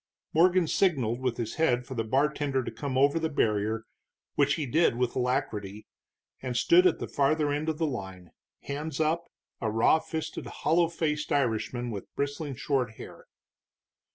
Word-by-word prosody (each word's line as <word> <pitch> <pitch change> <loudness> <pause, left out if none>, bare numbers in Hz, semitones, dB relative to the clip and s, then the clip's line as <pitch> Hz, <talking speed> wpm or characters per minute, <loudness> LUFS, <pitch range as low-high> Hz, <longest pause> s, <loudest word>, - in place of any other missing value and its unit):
Morgan 180 +2 +4
signaled 135 - +1
with 130 -2 -1
his 115 -2 -4
head 125 -6 +2
for 130 - -7
the 115 -3 -1
bartender 140 +2 +1
to - - -5
come 130 +4 -3
over 140 +4 +4
the 160 0 -1
barrier, 110 -4 0 0.5
which 145 0 +3
he 155 - -2
did, 150 0 +2
with 125 -1 0
alacrity, 105 -5 -2 0.6
and 125 -2 -3
stood 180 +7 +6
at 175 - +1
the - - -5
farther 145 +1 +1
end 150 +2 -1
of 155 - -2
the 160 - 0
line, 95 - -6 0.3
hands 145 +1 -5
up, 165 +2 0 0.3
a 110 - -1
raw 115 +8 +4
fisted, 160 0 -5
hollow 170 +1 +2
faced 155 -2 -2
Irishman 120 -3 0
with 100 -3 -7
bristling 140 0 -3
short 125 -3 -1
hair. - - -11
140 Hz, 165 wpm, -28 LUFS, 115-155 Hz, 0.6 s, stood